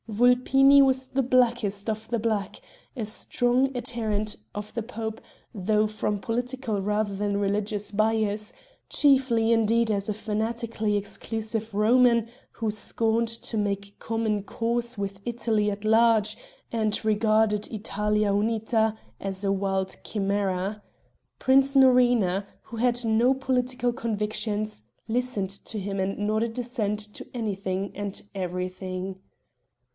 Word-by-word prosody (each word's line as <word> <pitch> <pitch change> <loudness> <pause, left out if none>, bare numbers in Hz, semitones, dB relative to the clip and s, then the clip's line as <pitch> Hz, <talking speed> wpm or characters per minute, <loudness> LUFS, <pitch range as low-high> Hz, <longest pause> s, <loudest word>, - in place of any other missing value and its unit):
Vulpini 255 +5 +5
was 260 -1 +2
the 270 +1 0
blackest 240 -5 +1
of 220 0 -4
the 235 - +1
Black, 210 -3 -1 0.4
a 225 - -2
strong 245 +4 +1
adherent 220 -4 -2 0.2
of 210 0 -6
the 235 - -2
pope, 220 -1 -5 0.3
though 210 +1 +1
from 210 -1 -2
political 245 -1 -2
rather 210 0 0
than 200 0 -1
religious 205 +1 -1
bias 215 0 +1 0.4
chiefly 260 -5 +3
indeed 225 0 +3
as 200 0 -1
a - - +1
fanatically 220 0 -2
exclusive 220 +2 -3
Roman, 235 +2 +4 0.3
who 220 -2 -2
scorned 225 +2 +1
to 230 0 -4
make 200 -1 -2
common 220 -2 -1
cause 235 +2 -2
with 200 -1 -4
Italy 225 -3 0
at 205 +1 -5
large, 220 -1 +4 0.4
and 220 -1 0
regarded 215 -1 +2
"Italia 210 -1 0
unita" 220 +1 +1 0.2
as 195 0 -4
a 195 - +2
wild 195 -1 -1
chimera. 200 0 -1 0.6
Prince 270 +1 +3
Norina, 245 -7 +4 0.2
who 230 - -9
had 245 0 +1
no 230 +4 +3
political 250 -2 0
convictions, 215 - -2 0.3
listened 225 -5 -1
to 210 +2 -6
him 195 0 -3
and 190 +1 -1
nodded 220 +3 -1
assent 225 -4 -2
to - - -7
anything 195 -4 -2
and 200 -1 -5
everything. 185 +1 -4
215 Hz, 125 wpm, -26 LUFS, 205-235 Hz, 0.6 s, Vulpini